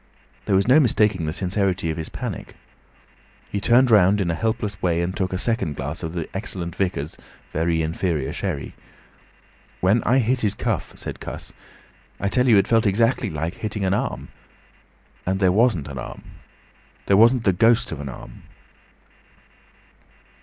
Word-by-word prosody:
There 95 - +2
was 95 +2 +2
no 130 +5 +7
mistaking 105 - +2
the - - -1
sincerity 95 -1 -1
of 80 - -5
his 80 - -4
panic. - - -6 1.0
He 100 - -2
turned 125 +3 +4
round 100 -1 +5
in 90 -4 0
a - - 0
helpless 110 +2 -2
way 85 -2 +1
and 85 +2 -2
took 95 -2 -1
a 90 - -1
second 115 -8 -1
glass 75 +6 -5
of 80 -1 -5
the 85 -3 -3
excellent 90 -4 -4
vicar's 90 -6 -2 0.4
very 80 +1 +1
inferior 80 -3 -2
sherry. - - -4 1.1
"When 100 +6 +3
I 125 +5 +2
hit 125 0 +1
his 105 -2 +1
cuff," - - -2
said - - -7
Cuss, - - -8 0.7
"I 100 - 0
tell 125 +4 +2
you, 115 -4 +6
it 100 - +3
felt 115 -2 +3
exactly 115 +3 +2
like 80 +2 -3
hitting 105 -1 -4
an 95 - +1
arm. 105 - -3 0.9
And 95 +1 -1
there 95 -2 +4
wasn't 100 - +2
an 70 -2 -6
arm! 65 - -8 0.8
There 100 - +3
wasn't 115 +2 +5
the 95 - +3
ghost 115 +5 +3
of 80 - -5
an 70 -1 -5
arm!" - - -11
95 Hz, 165 wpm, -23 LUFS, 85-110 Hz, 1.1 s, no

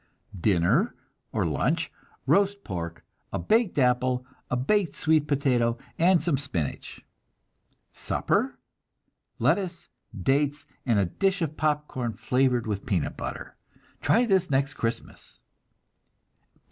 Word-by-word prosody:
Dinner, 100 - +2 0.4
or - - 0
lunch, - - 0 0.3
roast 200 0 +2
pork, 85 -3 -5 0.3
a - - -1
baked 220 -5 +2
apple, 125 -1 +2 0.2
a 125 - 0
baked 170 +6 +1
sweet 155 -2 +2
potato 125 -5 +2 0.2
and 175 0 +4
some 160 -6 +1
spinach. 90 - -4 0.9
Supper, 245 +7 0 0.8
lettuce, 170 -4 0 0.3
dates, 145 +7 +1 0.2
and 115 -3 +3
a 100 - +3
dish 190 - 0
of 155 -1 -3
popcorn 150 -6 -1
flavored 125 -1 +1
with 105 -3 -3
peanut 90 -7 0
butter. - - -6 0.5
Try 240 +2 +4
this 190 -5 +2
next 140 +1 +1
Christmas! 115 0 -5
140 Hz, 110 wpm, -27 LUFS, 120-175 Hz, 0.9 s, and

